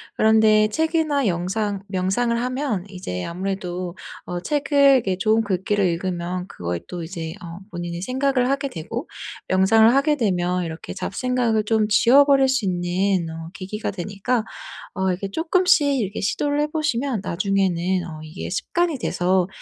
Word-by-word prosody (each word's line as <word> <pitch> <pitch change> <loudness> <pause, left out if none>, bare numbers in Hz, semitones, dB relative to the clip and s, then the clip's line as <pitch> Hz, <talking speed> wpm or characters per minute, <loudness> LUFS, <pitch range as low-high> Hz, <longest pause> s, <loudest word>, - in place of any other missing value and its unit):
그런데 215 -1 +5
책이나 315 +1 0
영상 195 +2 -1
명상을 195 +5 0
하면 250 -6 -2
이제 180 - -5
아무래도 180 0 -4 0.3
어 175 0 -4
책을 290 - -1 0.2
이렇게 195 -7 0
좋은 220 +3 +2
글귀를 200 0 0
읽으면 180 +1 -3
그거에 85 -1 -4
또 175 -1 -6
이제 165 -1 -5
어 170 0 -8
본인이 175 -1 -5
생각을 260 +1 +1
하게 275 0 0
되고 225 - -6 0.4
명상을 220 +5 +5
하게 295 +2 +3
되면 180 -5 0
이렇게 160 0 -7
잡생각을 240 -1 0
좀 215 -1 +2
지워버릴 270 +5 +5
수 260 -5 +1
있는 180 0 0
어 165 0 -7
계기가 200 +3 -4
되니까 205 +5 -2 0.5
어 190 -1 0
이게 195 +2 -5
쪼끔씩 325 - +3
이렇게 200 -1 -3
시도를 290 +8 0
해보시면 285 - -1
나중에는 185 -1 0
어 155 -2 -8
이게 155 +4 -7
습관이 330 - -1
돼서 185 -3 +1
200 Hz, 325 characters per minute, -22 LUFS, 180-255 Hz, 0.5 s, 그런데